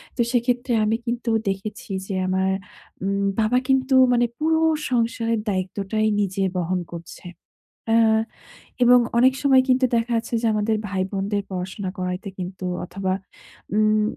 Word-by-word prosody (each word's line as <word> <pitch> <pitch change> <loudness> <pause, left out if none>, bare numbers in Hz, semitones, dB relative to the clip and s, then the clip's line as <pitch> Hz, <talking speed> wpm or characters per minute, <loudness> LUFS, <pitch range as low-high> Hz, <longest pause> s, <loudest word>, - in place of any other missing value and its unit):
তো 245 - 0
সেইক্ষেত্রে 245 0 0
আমি 220 +1 +2
কিন্তু 235 0 -2 0.2
দেখেছি 195 +2 -5 0.2
যে - - -4
আমার 190 0 +1 0.5
উম 200 0 0 0.2
বাবা 220 +3 +2
কিন্তু 265 0 +2 0.2
মানে 240 0 +3
পুরো 320 +1 +2 0.3
সংসারের 230 -1 0
দায়িত্বটাই 195 +3 -1 0.2
নিজে 195 0 -2 0.2
বহন 180 +1 0
করছে। 170 +1 -10 0.7
অ্যা 225 -1 +5 0.7
এবং 245 +1 +7 0.2
অনেক 260 +2 +5
সময় 265 -2 +5
কিন্তু 255 0 +4
দেখা 230 +1 0
যাচ্ছে 230 +1 -3
যে - - +1
আমাদের 215 +1 +1
ভাই 190 -1 -1
বোনদের 200 +1 -1
পড়াশোনা 185 +1 -4
করাইতে 180 +2 -3
কিন্তু 185 +1 -6 0.2
অথবা, 190 +1 -3 0.6
উম 215 0 +3
215 Hz, 140 wpm, -23 LUFS, 190-240 Hz, 0.7 s, এবং